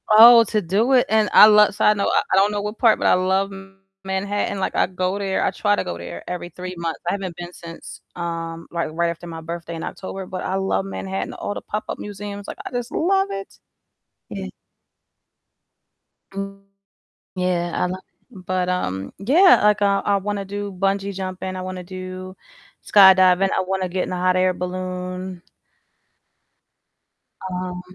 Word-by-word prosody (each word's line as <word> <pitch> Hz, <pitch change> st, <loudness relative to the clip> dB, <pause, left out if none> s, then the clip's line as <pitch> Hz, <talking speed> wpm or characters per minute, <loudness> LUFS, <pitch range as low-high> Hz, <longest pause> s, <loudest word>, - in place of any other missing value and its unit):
Oh, 230 Hz, +2 st, +9 dB
to 215 Hz, 0 st, 0 dB
do 205 Hz, +9 st, +1 dB
it, 250 Hz, -2 st, +5 dB
and 215 Hz, -1 st, +3 dB
I -, -, +10 dB
lo 210 Hz, -1 st, +6 dB
so 210 Hz, -, -1 dB
I 210 Hz, -, +6 dB
know 200 Hz, -1 st, -1 dB
I -, -, +3 dB
I -, -, +5 dB
don't 200 Hz, +2 st, +4 dB
know 205 Hz, -1 st, -2 dB
what 210 Hz, +2 st, -5 dB
part, 230 Hz, -3 st, +4 dB
but -, -, +1 dB
I -, -, +5 dB
love 190 Hz, +2 st, +1 dB, 0.5 s
Manhattan, 200 Hz, +1 st, -2 dB
like, 190 Hz, -, -2 dB
I -, -, +3 dB
go 185 Hz, +2 st, -2 dB
there 195 Hz, -1 st, -1 dB
I -, -, +1 dB
try 205 Hz, -1 st, +1 dB
to -, -, -2 dB
go 85 Hz, -1 st, -5 dB
there 85 Hz, 0 st, -9 dB
every 175 Hz, -1 st, -5 dB
3 180 Hz, +1 st, -7 dB
months. 165 Hz, -2 st, -3 dB
I -, -, +2 dB
haven't 190 Hz, -3 st, -4 dB
been 175 Hz, 0 st, -8 dB
since, 165 Hz, -1 st, -10 dB
um, 165 Hz, -1 st, -5 dB
like, 170 Hz, -2 st, -2 dB
right 170 Hz, +1 st, +1 dB
after 170 Hz, +1 st, -9 dB
my 165 Hz, -1 st, -7 dB
birthday 170 Hz, +1 st, -6 dB
in 165 Hz, -, -6 dB
October, 190 Hz, 0 st, -6 dB
but 185 Hz, 0 st, -6 dB
I 190 Hz, -, -2 dB
love 195 Hz, 0 st, 0 dB
Manhattan, 195 Hz, 0 st, -4 dB
all 205 Hz, -, -4 dB
the -, -, -6 dB
pop-up 210 Hz, +1 st, -5 dB
museums, 205 Hz, 0 st, -7 dB
like, -, -, -7 dB
I -, -, -6 dB
just 245 Hz, 0 st, -4 dB
love 385 Hz, +3 st, +1 dB
it. 195 Hz, 0 st, -7 dB, 0.7 s
Yeah. -, -, -6 dB, 1.9 s
Mm 195 Hz, 0 st, -6 dB, 0.7 s
Yeah, 180 Hz, -1 st, -1 dB
I -, -, 0 dB
lo 185 Hz, +1 st, -4 dB, 0.4 s
but, 185 Hz, -2 st, -2 dB
um, 95 Hz, -, -3 dB
yeah, 320 Hz, -, +6 dB
like, 210 Hz, 0 st, +3 dB
I 200 Hz, 0 st, +3 dB
I 200 Hz, -, +3 dB
wanna 200 Hz, 0 st, -3 dB
do 205 Hz, +1 st, -5 dB
bungee 195 Hz, +1 st, -1 dB
jumping, 185 Hz, 0 st, -5 dB
I 185 Hz, -, -5 dB
wanna 185 Hz, 0 st, -6 dB
do 185 Hz, 0 st, -8 dB, 0.5 s
skydiving, 190 Hz, -1 st, +6 dB
I -, -, +2 dB
wanna 190 Hz, 0 st, -2 dB
get 180 Hz, +1 st, -1 dB
in -, -, -6 dB
a -, -, -2 dB
hot 185 Hz, 0 st, +2 dB
air 185 Hz, 0 st, +2 dB
balloon 185 Hz, 0 st, -5 dB, 2.1 s
Um, 180 Hz, -1 st, -4 dB
190 Hz, 180 wpm, -22 LUFS, 180-200 Hz, 2.1 s, I